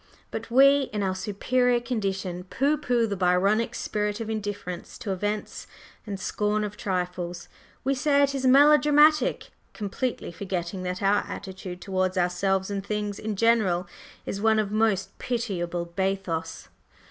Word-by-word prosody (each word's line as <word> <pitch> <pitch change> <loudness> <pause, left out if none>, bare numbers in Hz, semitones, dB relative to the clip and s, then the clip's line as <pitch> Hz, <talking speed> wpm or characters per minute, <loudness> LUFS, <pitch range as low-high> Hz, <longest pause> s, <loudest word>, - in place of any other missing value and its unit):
But - - -5
we, 275 +3 +5
in 210 -1 -2
our 190 -1 0
"superior" 240 +6 +1
condition, 195 -7 -3
pooh 275 +10 +1
pooh 245 -5 +1
the 205 -2 -2
Byronic 195 +5 +2
spirit 210 0 -2
of 225 -1 -4
indifference 205 -5 -5
to 200 - -4
events 205 +3 -3 0.4
and 200 -2 -4
scorn 210 +2 0
of 210 0 -4
trifles, 180 -3 -3 0.4
we 275 - +1
say 285 +1 +3
it 280 0 +1
is 265 -1 0
"melodramatic," 295 +1 +5 0.2
completely 215 +1 -3
forgetting 185 0 -4
that 180 +1 -4
our 200 +1 +3
attitude 185 -2 -7
towards 185 -1 -1
ourselves 190 +2 +1
and 200 -1 -3
things 210 0 -3
in 215 -1 -3
general 195 -5 +2 0.4
is 200 - -4
one 220 0 +4
of 210 -2 0
most 215 -3 0
pitiable 180 -8 -2
bathos. 170 - -3
205 Hz, 145 wpm, -26 LUFS, 185-235 Hz, 0.4 s, we